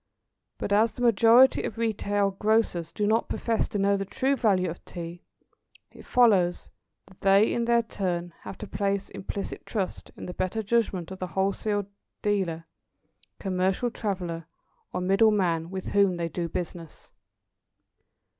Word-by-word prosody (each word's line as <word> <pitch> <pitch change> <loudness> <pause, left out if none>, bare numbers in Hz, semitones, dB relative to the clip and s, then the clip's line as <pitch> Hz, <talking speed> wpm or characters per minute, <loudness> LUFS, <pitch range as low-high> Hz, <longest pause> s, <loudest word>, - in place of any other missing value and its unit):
But 200 - -2
as 220 +3 +3
the 245 - -5
majority 235 +3 +6
of 225 - -5
retail 205 -3 0
grocers 195 -5 +1
do 210 - -1
not 220 +2 +1
profess 230 -2 0
to - - -4
know 200 0 +2
the 195 - -2
true 265 +7 0
value 195 -8 +2
of 170 +1 -6
Tea, 170 0 -8 0.7
it - - -15
follows 195 -8 +3 0.3
that 190 -1 -20
they 195 +2 +4
in 235 - 0
their 235 0 +3
turn, 175 -5 -3
have 190 - -9
to 210 - -7
place 200 0 -2
implicit 200 +1 -5
trust 195 -5 -4
in - - -7
the 180 - -6
better 185 +5 -2
judgment 200 -5 0
of 190 - -7
the 185 - -3
wholesale 200 +2 -1 0.4
dealer, 185 -6 0 0.7
commercial 190 +4 0
traveller, 180 -7 -4 0.4
or 180 - -3
middle 195 +4 +4
man 170 -6 +1
with 190 0 -5
whom 200 -3 +3
they 170 -1 -2
do 170 +1 -3
business. 170 -1 -7
195 Hz, 155 wpm, -27 LUFS, 180-215 Hz, 0.7 s, majority